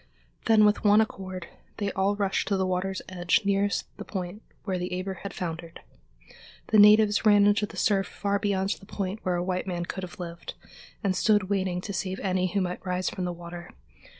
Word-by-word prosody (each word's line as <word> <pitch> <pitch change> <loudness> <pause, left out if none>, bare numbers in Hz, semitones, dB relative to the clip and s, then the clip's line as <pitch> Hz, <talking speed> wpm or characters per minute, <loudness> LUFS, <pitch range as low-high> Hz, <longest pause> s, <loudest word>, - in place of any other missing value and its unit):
Then 220 -2 +6
with 210 0 +2
one 210 0 +6
accord 190 -4 -3 0.3
they 200 -2 -1
all 195 +1 +1
rushed 200 -2 0
to 200 - +1
the 190 - +1
water's 185 +1 -2
edge 180 +2 +1
nearest 200 0 +1
the - - -6
point 185 +1 -5 0.2
where 190 -3 -2
the 180 +1 -3
Eber 190 -1 -5
had 200 - -5
foundered. 165 -1 -6 0.9
The 215 - +5
natives 210 0 +6
ran 205 -2 +6
into 205 +1 +3
the - - -12
surf 195 -2 +2
far 200 0 -1
beyond 195 -1 0
the 195 - -16
point 195 +1 -4
where 180 -1 0
a 175 - -1
white 185 +1 -2
man 175 -2 -2
could 190 - -5
have 180 0 -9
lived, 170 -1 -7 0.5
and 195 -2 +1
stood 205 -2 +2
waiting 185 -2 0
to 200 - -6
save 190 0 -3
any 185 -1 +1
who 200 - +1
might 180 -1 -3
rise 180 0 -1
from 185 - -4
the 180 - -2
water. 175 0 -9
190 Hz, 205 wpm, -27 LUFS, 180-205 Hz, 0.9 s, Then